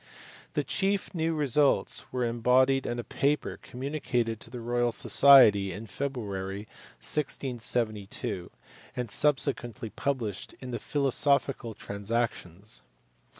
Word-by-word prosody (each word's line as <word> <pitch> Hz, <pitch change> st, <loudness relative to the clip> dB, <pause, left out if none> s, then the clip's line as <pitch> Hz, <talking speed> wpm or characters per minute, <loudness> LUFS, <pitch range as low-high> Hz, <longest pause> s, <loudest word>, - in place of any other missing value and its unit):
The -, -, +1 dB
chief 195 Hz, 0 st, -1 dB
new 165 Hz, -1 st, -1 dB
results 145 Hz, -1 st, +1 dB
were 125 Hz, -1 st, -1 dB
embodied 125 Hz, +3 st, +2 dB
in 120 Hz, -, -2 dB
a 120 Hz, -, -4 dB
paper 140 Hz, +6 st, -1 dB
communicated 125 Hz, -4 st, -3 dB
to -, -, -6 dB
the 120 Hz, +1 st, -7 dB
Royal 120 Hz, +1 st, 0 dB
Society 115 Hz, -9 st, +6 dB
in 100 Hz, +5 st, -7 dB
February, 100 Hz, -6 st, -4 dB, 0.4 s
1672, 115 Hz, -10 st, -1 dB, 0.5 s
and 120 Hz, -4 st, -3 dB
subsequently 130 Hz, -5 st, 0 dB
published 120 Hz, -8 st, -3 dB
in 130 Hz, -1 st, -7 dB
the 120 Hz, -, -3 dB
Philosophical 140 Hz, -4 st, +1 dB
Transactions. 100 Hz, -2 st, -4 dB
120 Hz, 110 wpm, -28 LUFS, 110-140 Hz, 0.5 s, Society